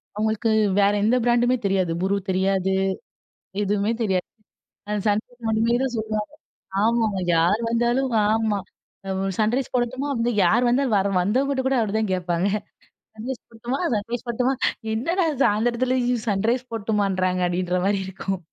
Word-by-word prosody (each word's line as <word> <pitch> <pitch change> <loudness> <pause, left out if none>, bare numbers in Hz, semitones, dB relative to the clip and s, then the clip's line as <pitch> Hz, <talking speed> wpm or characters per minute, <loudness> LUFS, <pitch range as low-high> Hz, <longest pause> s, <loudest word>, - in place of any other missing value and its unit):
அவுங்களுக்கு 220 +2 0 0.3
வேறு 200 +1 +4
எந்த 225 +4 +3
பிராண்டுமே 240 +1 +3
தெரியாது. 190 -3 +1
'ஃப்ரு' 195 +2 +1
தெரியாது, 190 0 +1 0.9
எதுவுமே 205 +1 +1
தெரியாது. 190 -5 0 0.8
'சன்ரைஸ்' 220 +3 -1
மட்டுமே 225 +2 +2
தான் 265 -2 -2
சொல்லுவாங்க. 215 0 -3 0.5
ஆமாங்க, 220 -3 +1 0.2
யார் 175 +7 +3
வந்தாலும். 240 +3 +1 0.2
ஆமா 220 -1 +1 0.6
வ் 195 0 -1
'சன்ரைஸ்' 235 +4 0
போடட்டுமா? 255 +3 -1 0.4
யார் 230 +8 +3
வந்தாலும் 250 -1 +2
வர 200 0 +1
வந்தவங்கிட்ட 265 +8 +1
கூட 265 0 +2
அப்படிதான் 215 -2 0
கேட்பாங்க. 175 0 0 0.7
'சன்ரைஸ்' 240 +3 -6
போடட்டுமா? 235 +4 -4
'சன்ரைஸ்' 230 +4 -3
போடட்டுமா? 250 +3 +1 0.4
"என்னடா 335 - 0 0.2
சாயந்தரத்துல 240 +4 +1 0.3
'சன்ரைஸ்' 230 +5 0
போடட்டுமான்றாங்க" 195 -4 0
அப்படின்ற 180 +1 -1
மாரியிருக்கும். 195 -1 -2
220 Hz, 120 wpm, -23 LUFS, 195-240 Hz, 0.9 s, வேறு